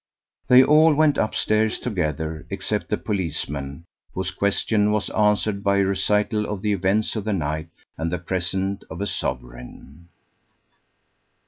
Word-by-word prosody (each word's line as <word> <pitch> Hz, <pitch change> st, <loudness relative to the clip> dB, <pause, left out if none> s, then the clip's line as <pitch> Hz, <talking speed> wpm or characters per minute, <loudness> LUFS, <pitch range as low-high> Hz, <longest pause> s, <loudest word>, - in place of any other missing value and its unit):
They 125 Hz, +1 st, +8 dB
all 155 Hz, +2 st, +5 dB
went 150 Hz, -1 st, +3 dB
upstairs 110 Hz, 0 st, +1 dB
together, 80 Hz, -7 st, -3 dB
except -, -, -3 dB
the -, -, 0 dB
policeman, 75 Hz, -6 st, -4 dB, 0.3 s
whose 95 Hz, -1 st, -2 dB
question 105 Hz, +2 st, +1 dB
was 105 Hz, -1 st, -1 dB
answered 105 Hz, -1 st, +1 dB
by 100 Hz, 0 st, +2 dB
a 100 Hz, -, +3 dB
recital 105 Hz, +2 st, +1 dB
of 105 Hz, -2 st, -5 dB
the 105 Hz, -1 st, +1 dB
events 100 Hz, +4 st, 0 dB
of 110 Hz, -, -2 dB
the 105 Hz, 0 st, -1 dB
night, 80 Hz, -2 st, -2 dB, 0.3 s
and 80 Hz, +1 st, -2 dB
the 90 Hz, -, -1 dB
present 95 Hz, +3 st, -2 dB
of 80 Hz, -, -7 dB
a 100 Hz, -, -1 dB
sovereign. 65 Hz, +3 st, -6 dB
100 Hz, 140 wpm, -23 LUFS, 80-105 Hz, 0.3 s, They